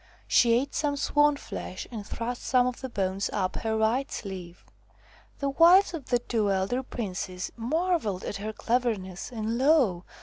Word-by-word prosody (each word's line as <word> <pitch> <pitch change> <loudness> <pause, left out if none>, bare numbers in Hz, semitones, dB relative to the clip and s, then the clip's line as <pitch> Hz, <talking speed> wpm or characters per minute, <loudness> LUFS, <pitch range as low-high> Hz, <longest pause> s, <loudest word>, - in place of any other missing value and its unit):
She 235 -1 +5
ate 265 +4 +1
some 290 -1 0
swan 295 +1 +3
flesh 185 - -6
and 220 -3 -5
thrust 235 +4 -4
some 250 -2 +3
of 250 -1 -3
the 260 - -4
bones 195 -2 -1
up 185 -3 -1
her 220 -1 -1
right 235 +6 +1
sleeve. 185 -3 -7 0.7
The 280 - -1
wives 345 +7 +6
of 310 -6 -6
the 245 - +3
two 230 -3 -1
elder 195 +7 0
princes 185 -7 -5
mar 330 +10 +1
velled 200 -8 -4
at - - -3
her 215 +2 -4
cleverness, 220 -5 -2
and 225 0 -2
lo 260 - +3
235 Hz, 170 wpm, -27 LUFS, 195-270 Hz, 0.7 s, wives